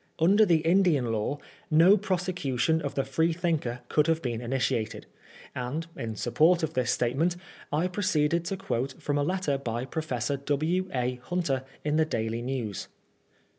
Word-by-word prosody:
Under 200 +6 +5
the 165 -3 +4
Indian 165 -9 +3
law, 110 +6 -1 0.3
no 165 +6 +7
prosecution 175 - 0
of 140 - -4
the 135 - +1
Freethinker 160 -4 0
could 150 +3 +2
have 165 -1 +2
been 120 -6 -3
initiated; 120 -3 -1 0.5
and, 130 +6 -3
in 110 -1 -4
sup 120 +3 -4
port 170 +2 +4
of 160 0 -1
this 125 -4 0
statement, 140 +9 +1 0.4
I 155 +5 +1
proceeded 170 -4 +1
to 195 +2 -2
quote 135 -9 -3
from 145 0 -1
a - - +2
letter 165 -4 0
by 120 -2 -3
Professor 140 -2 -2
W. 155 +7 0
A. 125 -1 -1
Hunter, 150 -8 -1 0.2
in 150 +1 +1
the 160 - +4
Daily 115 -5 -2
News. 120 -5 -3
150 Hz, 160 wpm, -28 LUFS, 125-170 Hz, 0.5 s, no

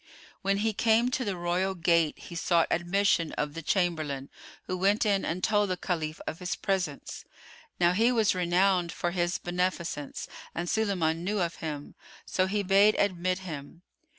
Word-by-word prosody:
[FN#103] - - -22
When 195 0 +1
he 220 +2 0
came 230 +3 +3
to 260 - 0
the 200 -5 -2
royal 180 +2 0
gate, 170 -3 +2
he - - -11
sought 170 0 +2
admission 175 -1 +1
of 150 -1 -2
the 165 - -5
chamberlain, 155 -6 -1 0.3
who 185 - -3
went 200 +4 +2
in 200 -2 +2
and 180 +2 -3
told 210 -2 +2
the 185 - -1
Caliph 160 -4 -3
of 160 - -5
his 180 0 -2
presence. 185 -7 -3 0.6
Now 175 -1 +5
he 225 +7 +3
was 225 -4 +3
renowned 180 0 +2
for 175 - -2
his 175 +1 0
beneficence 175 -5 -3 0.3
and 170 +1 -2
Sulayman 185 -7 +1
knew 205 +3 -1
of 170 -2 -1
him; 150 -3 -6 0.3
so 185 0 +1
he 205 +1 0
bade 200 +2 +5
admit 185 -2 +1
him. 155 +1 -8
180 Hz, 175 wpm, -28 LUFS, 170-200 Hz, 0.6 s, Now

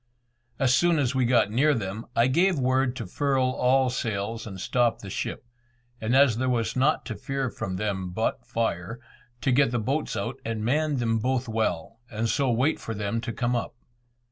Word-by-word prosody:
As 130 -2 +3
soon 175 +4 +3
as 140 -3 +1
we 130 -2 +2
got 115 -4 +3
near 140 +6 +3
them, 110 0 -4
I 115 - +4
gave 175 +7 +3
word 130 -1 +1
to - - -5
furl 135 -3 +1
all 130 0 +2
sails 110 -1 -3
and 95 -3 -7
stop 120 +3 +1
the 100 - -9
ship, 125 - -4 0.6
and 115 +3 +1
as 135 -5 +5
there 130 +1 0
was 115 -3 0
nought 135 +4 +2
to - - -5
fear 135 -3 -3
from 100 -4 -4
them 95 -2 -2
but 110 +6 -2
fire, 115 -1 -2 0.4
to 135 - +1
get 135 0 +4
the 120 - -1
boats 135 +7 -1
out 100 - -3
and 110 -1 -3
man 150 +3 +1
them 115 -2 +1
both 130 +2 0
well, 110 -2 -2
and 115 0 -2
so 135 +2 +1
wait 130 +6 +1
for 115 - -5
them 105 +3 -2
to 115 0 -4
come 120 +1 -1
up. 120 - -3
120 Hz, 195 wpm, -26 LUFS, 110-130 Hz, 0.6 s, as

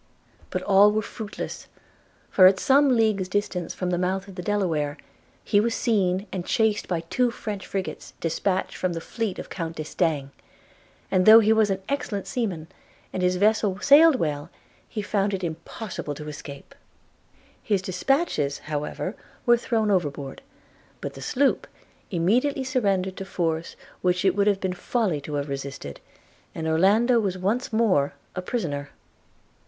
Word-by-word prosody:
But - - -3
all 200 +1 +6
were 215 +1 0
fruitless; 210 -1 -7 0.6
for, 185 -2 +8
at 190 0 +4
some 280 +1 +4
leagues 215 -4 +2
distance 185 -2 -2
from 180 -1 -2
the 175 - 0
mouth 190 +2 -1
of 195 - -10
the 180 - -6
Delaware, 165 -7 -1 0.5
he 205 - +3
was 230 +2 +1
seen 195 -4 +1
and 185 -2 -3
chased 220 +1 +1
by 170 -3 -1
two 245 +9 +1
French 210 -4 -6
frigates 195 -1 -5
dispatched 185 +3 -1
from 185 -1 -1
the 165 - -3
fleet 220 +3 -3
of - - -8
Count 165 -1 -4
D'Estaing; 155 -3 -1 0.8
and 185 +1 +2
though 220 +1 +11
he 220 0 +4
was 220 -2 +3
an 190 0 -2
excellent 230 -8 -2
seaman, 195 - -3 0.5
and 185 - -2
his 180 0 +2
vessel 205 0 +2
sailed 295 +5 +7
well, 150 - -2 0.4
he 215 -3 -4
found 205 -1 0
it 190 - -6
impossible 165 0 -5
to 150 +1 -8
escape. 145 - -9 0.5
– - - -33
His 195 -2 +2
dispatches, 185 - 0
however, 150 +6 -4 0.3
were 240 - +6
thrown 225 -3 0
overboard; 145 -7 -2 0.6
but - - -5
the - - -10
sloop 275 +1 +1 0.4
immediately 240 +11 +1
surrendered 200 -8 0
to - - -4
force 165 -3 -2 0.3
which 180 +1 +1
it 190 -1 +3
would 200 0 +2
have 200 -2 +3
been 190 -1 -2
folly 185 - -1
to 145 +1 -5
have 145 0 -2
resisted, 135 - -6 0.6
and 160 -1 -3
Orlando 210 +9 +4
was 195 -4 -1
once 210 +8 -1
more 195 -12 +2 0.2
a 185 - -2
prisoner. 155 - -3
190 Hz, 160 wpm, -25 LUFS, 165-220 Hz, 0.8 s, though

